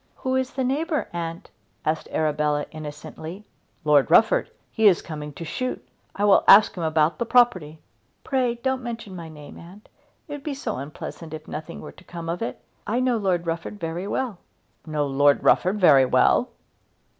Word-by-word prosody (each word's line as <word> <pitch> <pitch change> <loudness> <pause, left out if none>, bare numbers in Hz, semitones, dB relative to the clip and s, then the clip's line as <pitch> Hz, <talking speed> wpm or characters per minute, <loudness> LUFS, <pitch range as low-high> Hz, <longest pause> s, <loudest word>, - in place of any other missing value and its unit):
"Who 260 0 -2
is 260 -1 -1
the 265 0 -1
neighbour, 300 +4 -1
aunt?" 165 -1 -5 0.3
asked 155 0 -1
Arabella, 150 -1 0
innocently. 155 +5 -8 0.4
"Lord 150 -2 +4
Rufford. 220 +7 +4 0.2
He 220 -2 +3
is 185 -4 +5
coming 150 -2 -7
to 165 - -8
shoot. 255 +10 -4 0.3
I 205 - 0
will 205 - +5
ask 210 +1 +8
him 180 - -5
about 160 0 +1
the 235 - 0
property." 190 -12 +3 0.5
"Pray 255 -3 0
don't 260 +2 -2
mention 230 -5 -7
my 165 -2 -8
name, 150 -2 -12
aunt. 185 +5 -14 0.4
It - - -12
would 290 -1 -6
be 290 -2 -3
so 270 - -4
unpleasant 155 +3 -7
if 155 0 -11
nothing 155 +2 -7
were - - -9
to - - -18
come 170 -2 -7
of 170 +4 -3
it. 230 - -4 0.3
I 235 +3 0
know 255 -2 +1
Lord 185 -5 0
Rufford 165 +5 -4
very 170 +3 -4
well." 230 -5 -3 0.5
"Know 150 -2 -1
Lord 140 +1 +3
Rufford 190 +4 +3
very 140 -8 +6
well!" - - +3
175 Hz, 180 wpm, -24 LUFS, 155-235 Hz, 0.5 s, ask